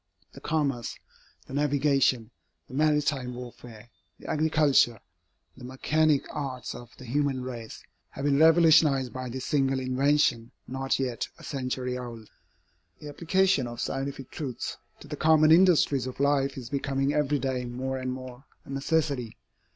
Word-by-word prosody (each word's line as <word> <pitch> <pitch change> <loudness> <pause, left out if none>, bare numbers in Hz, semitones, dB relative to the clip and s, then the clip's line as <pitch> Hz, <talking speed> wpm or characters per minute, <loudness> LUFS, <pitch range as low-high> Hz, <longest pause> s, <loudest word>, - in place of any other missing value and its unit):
The - - -13
commerce, 140 -7 -1 0.5
the - - -11
navigation, 140 -5 +1 0.4
the - - -14
maritime 145 -3 +1
warfare, 120 -2 -11 0.3
the - - -17
agriculture, 150 -7 +3 0.6
the 125 - -13
mechanic 145 +3 +1
arts 130 -4 -5
of 120 -1 -10
the 130 - -11
human 135 +1 -1
race, 120 -3 -8 0.3
have 135 - -6
been 140 -1 +3
revolutionized 160 -5 +5
by 130 -1 -5
this 130 +2 -5
single 135 -2 +1
invention 130 -2 +1 0.2
not 135 +1 -1
yet 125 -4 -2
a - - -15
century 125 -2 -3
old. 115 -3 -9 0.7
The 150 - -9
application 175 -2 +1
of 120 0 -8
scientific 135 -1 -4
truths 135 -6 -5 0.3
to - - -11
the - - -5
common 155 0 +4
industries 160 -7 +4
of 130 - -8
life 140 -1 +1
is 125 -2 -8
becoming 135 0 0
every 150 -1 +1
day 130 -2 -2
more 130 +2 -4
and 130 0 -3
more 130 +1 -8 0.2
a - - -10
necessity. 135 -4 -1
135 Hz, 145 wpm, -27 LUFS, 125-145 Hz, 0.7 s, revolutionized